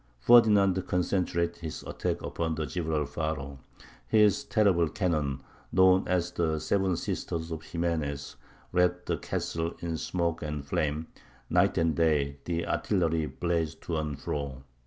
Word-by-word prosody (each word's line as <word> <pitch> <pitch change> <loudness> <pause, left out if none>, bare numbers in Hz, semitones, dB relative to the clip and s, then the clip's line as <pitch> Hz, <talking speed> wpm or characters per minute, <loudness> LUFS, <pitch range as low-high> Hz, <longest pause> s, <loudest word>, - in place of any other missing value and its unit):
Ferdinand 100 - +5
concentrated 90 -1 0
his 80 -2 -6
attack - - -3
upon 80 -1 -2
the 80 0 -2
Gibralfaro; 75 -4 -3 0.5
his 105 - +4
terrible 95 - +3
cannon, 75 -8 -1 0.3
known 95 0 +5
as 90 -1 0
the 80 -3 0
"Seven 95 +3 +1
Sisters 80 0 -3
of 80 -1 -5
Ximenes," 80 -5 -2 0.4
wrapped 90 0 +2
the - - -1
castle 80 +1 -3
in 85 -1 -3
smoke 85 0 -1
and 75 -2 -4
flame; 75 +2 -1 0.5
night - - +3
and 80 -1 +2
day 75 -3 +2
the 85 -1 -1
artillery 80 -6 0
blazed 80 -2 -2
to 85 - -2
and 75 -3 -3
fro. 70 -3 -4
85 Hz, 135 wpm, -29 LUFS, 75-90 Hz, 0.5 s, Ferdinand